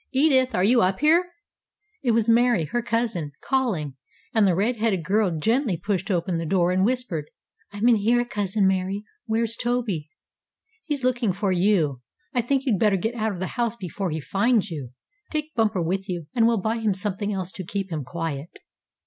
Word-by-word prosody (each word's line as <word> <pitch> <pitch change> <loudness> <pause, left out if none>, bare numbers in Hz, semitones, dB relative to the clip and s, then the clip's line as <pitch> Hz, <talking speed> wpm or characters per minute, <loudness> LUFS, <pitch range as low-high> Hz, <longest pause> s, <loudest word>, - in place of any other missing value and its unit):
"Edith, 260 -3 +3
are 180 - +2
you 235 +4 +5
up 190 +1 +1
here?" 335 +4 +4 0.7
It 250 - -1
was 230 -1 +2
Mary, 235 -6 +4
her 240 +11 -1
cousin, 225 -10 -1
calling, 195 - -1 0.4
and 220 -3 +4
the 180 - +3
red 225 +6 +1
haired 210 -6 0
girl 190 -1 +1
gently 225 - +1
pushed 190 +2 -2
open 175 -2 0
the 165 - -3
door, 180 0 +2
and 185 +1 +2
whispered. 215 - -1 0.4
"I'm 205 +3 0
in 235 -2 +6
here, 240 +4 +2
cousin 205 -3 0
Mary. 190 +2 0 0.2
Where's 225 0 0
Toby?" 230 -11 -2 0.8
"He's 295 -5 -2
looking 245 -4 +1
for 195 +1 -1
you. 175 -8 +2 0.3
I 250 - +2
think 265 +3 0
you'd 220 -8 +1
better 210 -3 +3
get 220 +5 -2
out 220 -2 -1
of 185 - -6
the 185 - -1 0.2
house 235 -1 0
before 190 -2 -4
he 160 0 -2
finds 205 - +1
you. 140 -6 -5 0.4
Take 305 0 -3
Bumper 215 -6 +1
with 190 +4 -2
you, 175 -3 -3
and 230 -2 +4
we'll 230 -2 +2
buy 220 +4 0
him 215 -4 +1
something 200 +1 -2
else 190 -2 -3
to 190 - -7
keep 195 +1 -4
him 155 -3 -3
quiet." 165 0 -4
205 Hz, 190 wpm, -24 LUFS, 180-235 Hz, 0.8 s, in